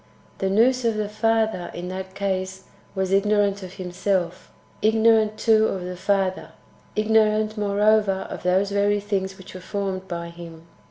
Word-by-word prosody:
The 195 Hz, -, 0 dB
Nous 245 Hz, +6 st, +3 dB
of 230 Hz, -2 st, +1 dB
the 215 Hz, -1 st, -1 dB
Father, 220 Hz, -3 st, 0 dB
in 175 Hz, +1 st, -5 dB
that 190 Hz, 0 st, -7 dB
case, 190 Hz, -1 st, -3 dB, 0.3 s
w^as 190 Hz, 0 st, 0 dB
ignorant 200 Hz, 0 st, +2 dB
of 185 Hz, -1 st, -9 dB
Himself; 185 Hz, -1 st, -2 dB, 0.3 s
ignorant, 220 Hz, 0 st, +3 dB
too, 220 Hz, -1 st, +4 dB
of 185 Hz, -2 st, -3 dB
the 180 Hz, 0 st, -5 dB
Father; 185 Hz, -4 st, -1 dB, 0.4 s
ignorant, 215 Hz, 0 st, +2 dB
moreover, 205 Hz, -1 st, +2 dB
of -, -, -7 dB
those 190 Hz, +2 st, +1 dB
very 205 Hz, +1 st, +2 dB
things 195 Hz, -2 st, -3 dB
which 190 Hz, -, -12 dB
were 185 Hz, -, -8 dB
formed 190 Hz, -1 st, -4 dB
by 170 Hz, -1 st, -5 dB
Him. 170 Hz, -1 st, -11 dB
200 Hz, 155 wpm, -23 LUFS, 185-215 Hz, 0.4 s, too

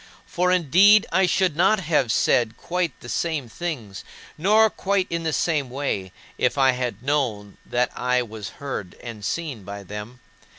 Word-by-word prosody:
For, 180 Hz, +1 st, 0 dB
indeed, 185 Hz, +5 st, +5 dB
I 185 Hz, +2 st, +3 dB
should 180 Hz, -2 st, +1 dB
not 195 Hz, +5 st, +3 dB
have 150 Hz, -, +1 dB
said 110 Hz, 0 st, +2 dB
quite 175 Hz, -5 st, -2 dB
the -, -, -10 dB
same 155 Hz, -1 st, -2 dB
things, 115 Hz, -, -6 dB, 0.3 s
nor 215 Hz, +6 st, +4 dB
quite 195 Hz, -1 st, 0 dB
in 170 Hz, 0 st, -1 dB
the 160 Hz, -1 st, -1 dB
same 150 Hz, -4 st, 0 dB
way, 125 Hz, -8 st, -3 dB, 0.3 s
if -, -, +1 dB
I 135 Hz, -1 st, +5 dB
had 125 Hz, -1 st, -4 dB
known 120 Hz, -8 st, -1 dB
that 125 Hz, 0 st, 0 dB
I 125 Hz, 0 st, +1 dB
was 110 Hz, -3 st, -7 dB
heard 135 Hz, -10 st, -5 dB
and 115 Hz, -3 st, -8 dB
seen 145 Hz, -6 st, -3 dB
by 100 Hz, +1 st, -8 dB
them. 105 Hz, +6 st, -8 dB
140 Hz, 165 wpm, -23 LUFS, 115-175 Hz, 0.3 s, indeed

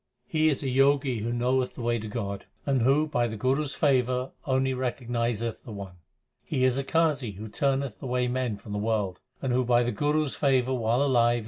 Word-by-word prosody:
2 160 Hz, -, -1 dB
He 155 Hz, 0 st, +5 dB
is 145 Hz, -1 st, -1 dB
a -, -, -1 dB
Jogi 135 Hz, -2 st, +3 dB
who 115 Hz, +3 st, -2 dB
knoweth 125 Hz, +2 st, 0 dB
the -, -, -7 dB
way 120 Hz, 0 st, +1 dB
to 110 Hz, -, -6 dB
God, 100 Hz, -3 st, -4 dB, 0.2 s
And 135 Hz, -3 st, +2 dB
who 135 Hz, +6 st, +4 dB
by 120 Hz, -6 st, 0 dB
the 110 Hz, -1 st, -5 dB
Guru 130 Hz, +7 st, +1 dB
s 140 Hz, -, -5 dB
favour 130 Hz, -2 st, +1 dB, 0.2 s
only 130 Hz, 0 st, +2 dB
recognizeth 120 Hz, -3 st, -2 dB
the 115 Hz, -, -9 dB
One. 100 Hz, -3 st, -8 dB, 0.5 s
He 135 Hz, -5 st, -1 dB
is 130 Hz, -1 st, +3 dB
a -, -, -1 dB
Qazi 140 Hz, -, +1 dB
who 105 Hz, +3 st, -7 dB
turneth 135 Hz, +2 st, -1 dB
away 125 Hz, -2 st, 0 dB
men 125 Hz, -4 st, -1 dB
from 105 Hz, +1 st, -11 dB
the 105 Hz, -, -2 dB
world, 105 Hz, -3 st, -1 dB, 0.2 s
And 130 Hz, -2 st, 0 dB
who 130 Hz, +1 st, +2 dB
by 120 Hz, 0 st, +3 dB
the 120 Hz, -, 0 dB
Guru 150 Hz, +3 st, +1 dB
s 140 Hz, -, -4 dB
favour 130 Hz, -2 st, +2 dB
while 120 Hz, +2 st, +1 dB
alive 120 Hz, -4 st, +4 dB
is -, -, 0 dB
dead. -, -, -2 dB
125 Hz, 230 wpm, -27 LUFS, 115-135 Hz, 0.5 s, He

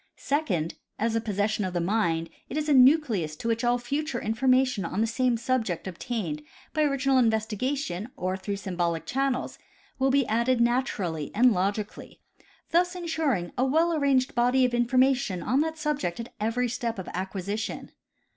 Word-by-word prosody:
Second, 200 Hz, -, -1 dB, 0.2 s
as 225 Hz, +1 st, 0 dB
a 225 Hz, -, +1 dB
possession 210 Hz, 0 st, -1 dB
of 185 Hz, -1 st, -3 dB
the -, -, +2 dB
mind 170 Hz, -3 st, 0 dB, 0.2 s
it 275 Hz, -, -4 dB
is 305 Hz, 0 st, -1 dB
a 295 Hz, -, +4 dB
nucleus 250 Hz, -, +4 dB
to 230 Hz, -, -6 dB
which 230 Hz, +1 st, 0 dB
all 240 Hz, 0 st, +3 dB
future 275 Hz, +2 st, -2 dB
information 255 Hz, 0 st, +2 dB
on 185 Hz, +4 st, -3 dB
the 225 Hz, -, +3 dB
same 240 Hz, +1 st, +1 dB
subject 225 Hz, -7 st, -1 dB
obtained 180 Hz, -4 st, -4 dB, 0.3 s
by 310 Hz, -, +1 dB
original 275 Hz, -2 st, +2 dB
investigation 220 Hz, -1 st, -1 dB
or 185 Hz, -6 st, -1 dB
through 200 Hz, +2 st, -4 dB
symbolic 175 Hz, -4 st, -2 dB
channels 265 Hz, +5 st, -1 dB, 0.4 s
will 265 Hz, +1 st, +3 dB
be 275 Hz, -1 st, +3 dB
added 235 Hz, +3 st, +1 dB
natur 240 Hz, -3 st, +1 dB
ally 160 Hz, -4 st, -3 dB
and 245 Hz, +2 st, +5 dB
logically, 200 Hz, +3 st, -3 dB, 0.5 s
thus 355 Hz, +2 st, +2 dB
insuring 315 Hz, -, -1 dB
a -, -, +4 dB
well 320 Hz, +6 st, +2 dB
arranged 275 Hz, -4 st, +2 dB
body 250 Hz, +2 st, +3 dB
of 250 Hz, -, 0 dB
infor 240 Hz, +1 st, +1 dB
mation 255 Hz, -8 st, +2 dB
on 260 Hz, -, +2 dB
that 320 Hz, 0 st, -2 dB
subject 290 Hz, -, -2 dB
at 230 Hz, -, -7 dB
every 230 Hz, +4 st, 0 dB
step 235 Hz, -1 st, -3 dB
of 190 Hz, -, -6 dB
acquisition. 195 Hz, +3 st, -4 dB
235 Hz, 170 wpm, -27 LUFS, 200-265 Hz, 0.5 s, and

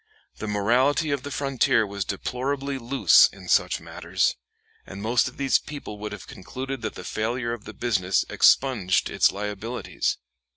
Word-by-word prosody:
The 110 Hz, -, -5 dB
morality 125 Hz, +9 st, +2 dB
of 140 Hz, -2 st, -1 dB
the 145 Hz, -, -7 dB
frontier 135 Hz, -5 st, +1 dB
was 100 Hz, 0 st, -4 dB
deplorably 135 Hz, +6 st, -3 dB
loose 120 Hz, -6 st, +5 dB
in -, -, -13 dB
such -, -, +2 dB
matters, 85 Hz, +3 st, -1 dB, 0.5 s
and 95 Hz, -, -10 dB
most 115 Hz, +5 st, +2 dB
of 125 Hz, -, -9 dB
these 135 Hz, -2 st, +2 dB
people 140 Hz, -8 st, -8 dB
would 105 Hz, 0 st, -5 dB
have 105 Hz, -2 st, -8 dB
concluded 130 Hz, +7 st, -7 dB
that 110 Hz, -, -4 dB
the -, -, -8 dB
failure 115 Hz, +2 st, -2 dB
of 115 Hz, -3 st, -8 dB
the -, -, -8 dB
business 95 Hz, -6 st, +1 dB
expunged 110 Hz, -9 st, +3 dB
its -, -, +4 dB
liabilities. 105 Hz, +4 st, -3 dB
115 Hz, 160 wpm, -25 LUFS, 100-135 Hz, 0.5 s, loose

